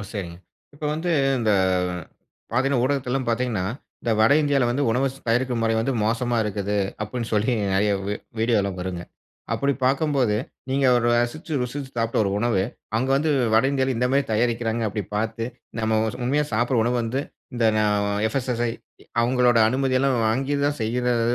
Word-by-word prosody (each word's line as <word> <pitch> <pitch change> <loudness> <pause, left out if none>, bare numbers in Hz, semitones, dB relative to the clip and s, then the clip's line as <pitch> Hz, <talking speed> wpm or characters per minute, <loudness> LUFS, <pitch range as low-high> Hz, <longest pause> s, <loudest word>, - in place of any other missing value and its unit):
சரிங்க. 90 -5 -5 0.4
இப்ப 150 - -8
வந்து, 170 +3 -2 0.3
இந்த 110 -3 +2 1.0
பாத்தீங்கன்னா 130 +1 +2
ஊடகத்தெல்லாம் 135 -2 -1
பாத்தீங்கன்னா, 115 -5 0 0.4
இந்த 115 - -1
வட 110 +4 +5
இந்தியால 140 -4 +2
வந்து 135 +4 0
உணவ 125 +4 +1
ஸ் - - -14
தயாரிக்கும் 120 0 +1
முறை 115 0 +2
வந்து 130 +4 0
மோசமா 120 +2 0
இருக்குது. 105 0 -2 0.3
அப்டின்னு 115 +2 -4
சொல்லி 110 +4 +2 0.2
நெறைய 100 +1 +2
வீ 105 - -1 0.2
வீடியோ 115 0 +2
எல்லாம் 100 -2 -3
வருங்க. 90 -1 -4 0.5
அப்படி 140 0 +1
பார்க்கும்போது, 135 -5 +2 0.3
நீங்க 135 0 +2 0.2
ரசிச்சு, 120 +7 0
ருசிச்சு 130 +2 -5
சாப்ட்ட 115 0 0
ஒரு 100 - 0
உணவு, 110 -4 +1 0.4
அங்க 130 - -1
வந்து 155 +2 +1 0.2
வட 110 - +5
இந்தியால 130 -1 0
இந்த 125 +2 +1
மாரி 140 0 +3
தயாரிக்கிறாங்க, 115 0 0
அப்படி 105 -1 -4
பாத்து. 115 +1 -2 0.3
நம்ம 110 0 +1
ஸ் - - -9
உண்மையா 145 +4 +1
சாப்டுற 120 +3 +1
உணவு 125 +1 +1
வந்து 130 +5 -2 0.3
இந்த 120 - 0 0.6
எஃப் 125 - -5
எஸ் 125 - -5
எஸ் 120 - -3
சை 120 - +1 0.5
அவங்களோட 120 0 +3
அனுமதி 130 +1 +1
எல்லாம் 135 -1 +2
வாங்கித்தான் 140 +4 0
செய்யறது. 120 +1 +1
120 Hz, 165 wpm, -23 LUFS, 110-135 Hz, 1.0 s, வட